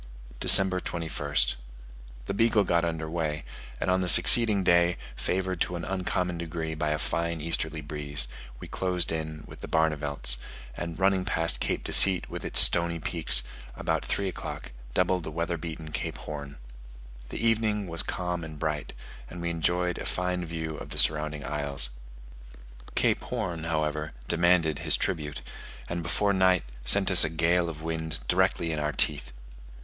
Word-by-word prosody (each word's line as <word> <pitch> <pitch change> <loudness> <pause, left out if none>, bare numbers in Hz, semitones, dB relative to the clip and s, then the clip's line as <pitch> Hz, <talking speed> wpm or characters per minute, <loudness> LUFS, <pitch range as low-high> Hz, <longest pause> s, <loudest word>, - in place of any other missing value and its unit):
December 95 -1 +7
21st. 75 -7 -1 0.7
The - - -4
Beagle 115 0 +2
got 85 -2 +1
under 80 -1 -3
way: 80 -2 -3 0.4
and - - -1
on 95 0 +1
the 90 - 0
succeeding 105 +2 +6
day, 85 0 +3 0.2
favoured 95 -1 -3
to 90 - 0
an 85 - -5
uncommon 90 -2 -3
degree 80 -1 -5
by 75 -1 -2
a 75 - 0
fine 85 +2 -3
easterly 80 0 +1
breeze, 70 -3 -1 0.3
we - - -9
closed 90 -3 -1
in 80 -1 -5
with - - -13
the - - -7
Barnevelts, 75 -6 +1 0.4
and 85 -1 -6
running 95 -1 +1
past 85 -2 0
Cape - - -2
Deceit 95 -2 +4
with - - -6
its - - +3
stony 85 0 +5
peaks, 80 -6 +6 0.3
about - - -2
three 100 - -2
o'clock 95 - -7 0.2
doubled 90 -1 +1
the 80 - -6
weather 85 +2 -3
beaten 80 -1 -8
Cape - - -5
Horn. 70 -2 -8 0.7
The - - -6
evening 110 -2 +1
was 85 -1 +1
calm 90 -2 -4
and 80 -1 -9
bright, 75 -1 -4 0.4
and 85 - -9
we 85 0 -3
enjoyed 90 +2 0
a - - -6
fine 90 0 -2
view 80 -1 -5
of - - -9
the - - -6
surrounding 75 -1 +1
isles. 70 -4 0 1.0
Cape - - +1
Horn, 80 -2 -4
however, 75 -1 -2
demanded 85 -3 +2
his - - +1
tribute, 75 -6 -3 0.5
and 85 0 -4
before 100 +4 0
night 95 -2 +2 0.2
sent 95 +9 +3
us 90 -1 +8
a 80 - 0
gale 85 +2 +1
of 80 -1 -9
wind 80 0 -4
directly 90 -2 +1
in 80 - -3
our 75 0 -2
teeth. 75 -1 0
85 Hz, 165 wpm, -27 LUFS, 75-90 Hz, 1.0 s, us